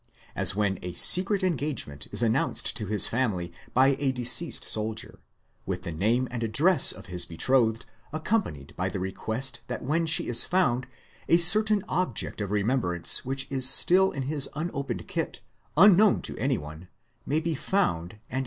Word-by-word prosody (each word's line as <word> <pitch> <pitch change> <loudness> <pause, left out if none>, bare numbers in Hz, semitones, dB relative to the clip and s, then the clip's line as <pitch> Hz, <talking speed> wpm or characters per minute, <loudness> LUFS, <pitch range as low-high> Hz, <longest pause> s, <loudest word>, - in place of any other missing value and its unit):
As 95 0 +2
when 100 -3 -2
a 90 -1 -7
secret 190 - +5
engagement 145 - -4
is - - 0
announced 115 0 0
to 105 - -5
his 105 +1 +5
family 100 -9 -3 0.2
by 135 +2 +3
a 140 -2 -1
deceased 130 +6 -1
soldier, 110 +2 0 0.5
with - - -5
the 85 - -6
name 110 +10 -1
and 120 -1 -6
address 140 - +4
of 95 +1 -6
his 90 -1 -3
betrothed, 115 +5 -1 0.3
accompanied 155 - -4
by 90 +1 -3
the 95 - -6
request 110 +8 -4
that 125 - -7
when 160 +5 -2
she 160 - +1
is 120 -1 +3
found 130 -9 -1 0.4
a 170 - +4
certain 210 +4 +5
object 155 - -3
of 100 - -5
remem 105 +6 -1
brance 90 -3 +2
which 135 +1 -2
is 130 -1 +3
still 185 +7 +5
in 135 - -6
his 140 0 0
unopened 150 -3 -6
kit, - - -5 0.4
unknown 205 +3 +4
to - - -2
anyone, 85 - -5 0.4
may 150 +3 -1
be 165 0 -3
found 130 - -3
and 105 0 -24
given 130 - -6
her. - - 0
125 Hz, 170 wpm, -25 LUFS, 100-155 Hz, 0.5 s, secret